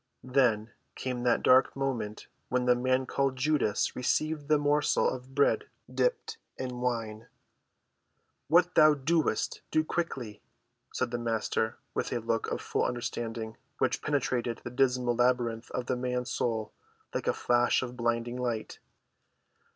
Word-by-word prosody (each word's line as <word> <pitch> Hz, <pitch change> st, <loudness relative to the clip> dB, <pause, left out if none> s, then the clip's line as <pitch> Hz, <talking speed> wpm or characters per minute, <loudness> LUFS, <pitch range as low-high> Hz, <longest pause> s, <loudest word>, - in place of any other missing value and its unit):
Then 120 Hz, -4 st, +2 dB, 0.2 s
came 125 Hz, -2 st, -3 dB
that 120 Hz, -1 st, +2 dB
dark 130 Hz, +1 st, +5 dB
moment 120 Hz, -6 st, -3 dB, 0.2 s
when 125 Hz, 0 st, +1 dB
the 125 Hz, -, +6 dB
man 130 Hz, +1 st, +1 dB
called 135 Hz, 0 st, 0 dB
Judas 130 Hz, -6 st, +1 dB
received 150 Hz, +3 st, 0 dB
the 155 Hz, 0 st, +4 dB
morsel 145 Hz, 0 st, +2 dB
of 130 Hz, +1 st, -5 dB
bread 150 Hz, -, +3 dB, 0.3 s
dipped 455 Hz, -2 st, 0 dB, 0.2 s
in 125 Hz, -1 st, -4 dB
wine. 115 Hz, -3 st, -2 dB, 1.2 s
"What 175 Hz, +3 st, +4 dB
thou 155 Hz, -1 st, +7 dB
doest, 150 Hz, -4 st, 0 dB
do 155 Hz, -, +2 dB
quickly," 130 Hz, -11 st, -3 dB, 0.5 s
said 130 Hz, -2 st, -2 dB
the 120 Hz, -, -2 dB
Master, 110 Hz, -1 st, -1 dB, 0.2 s
with -, -, -2 dB
a 125 Hz, -, 0 dB
look 115 Hz, 0 st, -1 dB
of -, -, -3 dB
full -, -, -1 dB
understanding 115 Hz, -2 st, -4 dB, 0.2 s
which -, -, 0 dB
penetrated 125 Hz, -5 st, -1 dB
the 120 Hz, -, -6 dB
dismal 125 Hz, -1 st, +2 dB
labyrinth 120 Hz, -2 st, +1 dB
of 125 Hz, -, -3 dB
the 130 Hz, -, 0 dB
man's 125 Hz, 0 st, -2 dB
soul 110 Hz, -3 st, -1 dB, 0.4 s
like -, -, -3 dB
a -, -, +5 dB
flash 120 Hz, +1 st, +2 dB
of 125 Hz, -1 st, -6 dB
blinding 120 Hz, 0 st, -1 dB
light. 120 Hz, -3 st, -3 dB
125 Hz, 145 wpm, -29 LUFS, 120-135 Hz, 1.2 s, thou